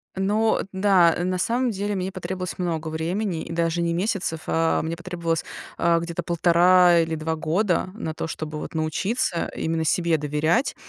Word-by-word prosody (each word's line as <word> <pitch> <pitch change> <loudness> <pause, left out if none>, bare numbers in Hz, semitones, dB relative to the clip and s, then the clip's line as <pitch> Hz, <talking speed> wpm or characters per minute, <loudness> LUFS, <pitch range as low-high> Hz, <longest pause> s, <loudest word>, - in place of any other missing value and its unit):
Но 210 +4 +1
да, 190 -3 +4
на 185 +1 -1
самом 240 +6 0
деле 205 0 -2
мне 190 0 -2
потребовалось 185 0 -5
много 165 -3 -2
времени, 170 +3 -2
и - - -8
даже 165 0 0
не 170 0 0
месяцев. 180 -3 -1
А 165 0 +1
мне 165 +1 -4
потребовалось, 170 -2 -3 0.3
а, 170 0 +3
где-то 170 0 -4
1,5 175 +1 +5
или 165 0 0
2 160 +1 -2
года 175 +4 0
на 160 -8 -4
то, 160 - -4
чтобы 155 -1 -5
вот - - -7
научиться 170 +5 -1
именно 160 0 -1
себе 170 0 +2
доверять, 150 - 0
170 Hz, 165 wpm, -24 LUFS, 160-185 Hz, 0.3 s, 1,5